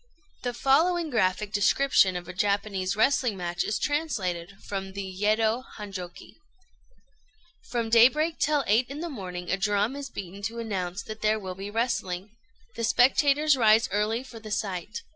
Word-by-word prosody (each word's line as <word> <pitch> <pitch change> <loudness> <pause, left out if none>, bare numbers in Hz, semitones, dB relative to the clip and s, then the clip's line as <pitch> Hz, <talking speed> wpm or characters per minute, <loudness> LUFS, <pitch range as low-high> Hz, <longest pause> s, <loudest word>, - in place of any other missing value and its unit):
The 245 -1 -3
following 320 +5 +2
graphic 210 -2 0
description 205 -2 +3
of 175 -1 -5
a 180 - -7
Japanese 200 -1 0
wrestling 240 -2 +2
match 175 -1 -2
is 210 - -1
translated 200 - -2
from 195 -1 -4
the 200 0 -4
"Yedo 215 +5 +1
Hanjôki": 190 -4 -8 1.3
"From 230 -2 -2
daybreak 300 +8 +4
till 290 0 +2
eight 230 +5 +2
in 285 +3 -6
the 340 - -4
morning 180 -7 -6
a 195 - +1
drum 205 +5 +1
is 280 -1 -6
beaten 195 -3 -8
to 225 +3 -4
announce 195 -5 -3
that 215 0 -8
there 215 0 +2
will 190 -3 -6
be 195 +2 -7
wrestling. 205 -4 -2 0.4
The 230 - -4
spectators 275 +5 +4
rise 225 -2 +4
early 215 +4 0
for 235 -4 -11
the 215 -1 -10
sight. 205 -2 -3
215 Hz, 160 wpm, -27 LUFS, 195-250 Hz, 1.3 s, daybreak